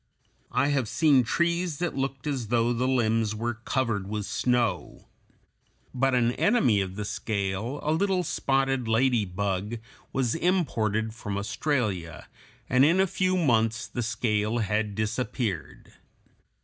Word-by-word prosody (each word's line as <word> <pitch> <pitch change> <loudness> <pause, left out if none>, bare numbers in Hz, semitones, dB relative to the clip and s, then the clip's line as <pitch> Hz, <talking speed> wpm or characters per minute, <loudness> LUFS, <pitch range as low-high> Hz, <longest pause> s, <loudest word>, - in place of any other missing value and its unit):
I 140 - +2
have 135 -6 0
seen 145 -6 +4
trees 170 +4 0
that 175 +1 -2
looked 135 0 -3
as 135 -6 -2
though 120 +1 +2
the 125 +2 0
limbs 115 -4 +1
were 120 +2 -2
covered 115 -4 -2
with 105 -1 -3
snow. 120 - -1 0.9
But 135 0 +2
an 120 -1 +3
enemy 125 - +3
of 95 -1 -4
the 105 0 -4
scale, 100 +6 -3
a 150 - +1
little 185 +2 +1
spotted 135 -5 0
lady 115 -1 +2
bug, 100 +3 -2 0.3
was 125 -3 0
imported 115 - 0
from 105 -3 -5
Australia, 100 - -2 0.4
and 130 +2 +4
in 165 +6 +4
a 190 - +5
few 185 0 0
months 115 -8 +2
the 120 - -4
scale 110 -1 0
had 105 -1 -1
disappeared. 110 - -3
120 Hz, 135 wpm, -27 LUFS, 105-135 Hz, 0.9 s, a